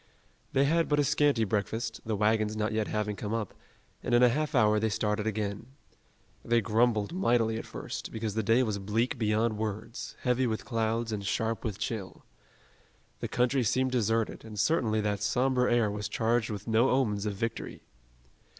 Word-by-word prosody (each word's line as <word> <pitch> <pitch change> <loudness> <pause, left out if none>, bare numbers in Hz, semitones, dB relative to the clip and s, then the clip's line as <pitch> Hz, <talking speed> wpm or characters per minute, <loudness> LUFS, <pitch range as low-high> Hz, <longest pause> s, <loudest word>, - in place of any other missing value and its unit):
They 135 +1 +3
had 165 +3 +2
but 145 - +2
a - - +4
scanty 145 -3 +2
breakfast, 110 +2 -2
the 110 -1 -2
wagons 110 +1 +1
not 110 0 0
yet 110 -1 0
having 105 -1 -2
come 105 +2 -3
up, 110 -4 -3 0.5
and 120 - +1
in 120 - +5
a 125 - +7
half 150 +4 -1
hour 105 -3 +4
they 110 +1 +1
started 105 0 -1
again. 105 0 -3 0.8
They 120 0 +3
grumbled 110 - +1
mightily 115 -10 +1
at - - -8
first, - - -6
because 110 -2 -3
the 110 - 0
day 115 +4 +3
was 105 -4 -2
bleak 110 +5 -1
beyond 110 0 +1
words, 110 +2 -5
heavy 125 0 +1
with 110 -1 -3
clouds, 115 -1 -1
and 105 -2 -3
sharp 110 +3 -1
with 105 -4 -3
chill. 105 -3 -5 0.9
The - - -3
country 125 +2 +1
seemed 130 +4 +1
deserted 115 -2 0
and 110 -2 -8
certainly 110 -3 +2
that 105 -1 -1
somber 125 +4 +2
air 120 -3 +2
was 105 0 -4
charged 115 +2 +1
with 105 -1 -6
no 115 +4 +3
omens 105 -6 +1
of 105 - -2
victory. 115 +4 -4
110 Hz, 180 wpm, -29 LUFS, 105-120 Hz, 0.9 s, a